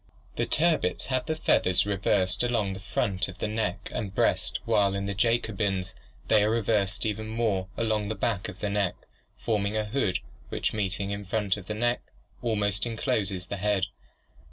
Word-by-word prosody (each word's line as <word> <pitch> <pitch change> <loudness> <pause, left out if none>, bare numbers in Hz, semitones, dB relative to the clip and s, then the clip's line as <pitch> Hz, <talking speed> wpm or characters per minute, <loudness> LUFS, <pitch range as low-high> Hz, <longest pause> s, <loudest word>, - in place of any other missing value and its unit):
The - - 0
turbits 155 - +2
have 130 +3 0
the 160 - 0
feathers 90 - +3
reversed 95 -2 +2
along 115 -5 +1
the 95 - -6
front 95 0 -1
of 95 0 -9
the - - -1
neck 105 -4 -2
and 100 -3 -3
breast - - +2
while 100 -1 +3
in 100 0 -2
the 100 - -1
Jacobins 100 -3 0 0.3
they 105 -2 +5
are 105 - +3
reversed 105 -3 +1
even 110 0 -2
more 110 -4 0
along 110 -2 0
the 110 - -1
back 100 -2 -1
of 95 - -10
the 105 - 0
neck, 100 -3 +1 0.4
forming 105 -1 0
a 110 - 0
hood 105 -5 +1 0.3
which, - - -1
meeting 100 -1 -1
in 100 0 -3
front 100 -1 0
of 100 -2 -10
the 105 - -3
neck, 120 +2 +1 0.4
almost 105 -2 +1
encloses 100 -5 -1
the 100 - -4
head. 100 -1 +1
105 Hz, 180 wpm, -28 LUFS, 95-110 Hz, 0.4 s, they